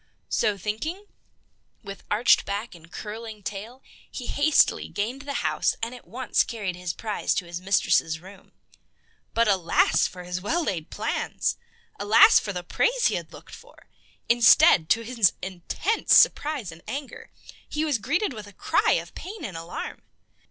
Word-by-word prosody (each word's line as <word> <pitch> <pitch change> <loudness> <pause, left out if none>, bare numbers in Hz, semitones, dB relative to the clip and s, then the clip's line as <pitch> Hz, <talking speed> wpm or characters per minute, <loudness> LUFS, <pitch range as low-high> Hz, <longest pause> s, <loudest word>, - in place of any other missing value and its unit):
So, 205 -1 +1
thinking, 305 - -4 0.8
with 195 -1 -9
arched 220 +4 +4
back 205 +4 -4
and 170 -1 -16
curling 220 0 -8
tail, 220 +7 -7 0.3
he 250 - -7
hastily 290 +4 +2
gained 235 +7 -4
the 285 0 -5
house - - +1
and 230 +2 -3
at 250 - -13
once 255 +2 0
carried 205 -6 -3
his 180 -1 -4
prize 215 +3 -2
to 180 - -2
his 170 +1 -7
mistress' 185 -4 +2
room. 190 +3 -15 0.8
But 230 0 +3
alas 185 -5 +3
for 180 0 -10
his 180 +1 -4
well 330 - 0
laid 170 - -3
plans! 220 +2 -2 0.4
Alas 205 +2 +7
for 205 - -5
the 180 -2 -5
praise 485 - +1
he - - -3
had - - -4
looked - - -14
for! - - -15 0.4
Instead, 225 -8 +6
to 230 - +3
his 230 -5 +2
intense 190 - 0
surprise 290 - +3
and 165 0 -13
anger, 280 0 -7 0.4
he 305 +1 -1
was 290 -7 0
greeted 305 - -1
with 210 -3 -9
a 205 - -14
cry - - +2
of - - -3
pain 390 -1 -8
and 190 - -7
alarm. 165 +1 -7
215 Hz, 160 wpm, -25 LUFS, 185-260 Hz, 0.8 s, Alas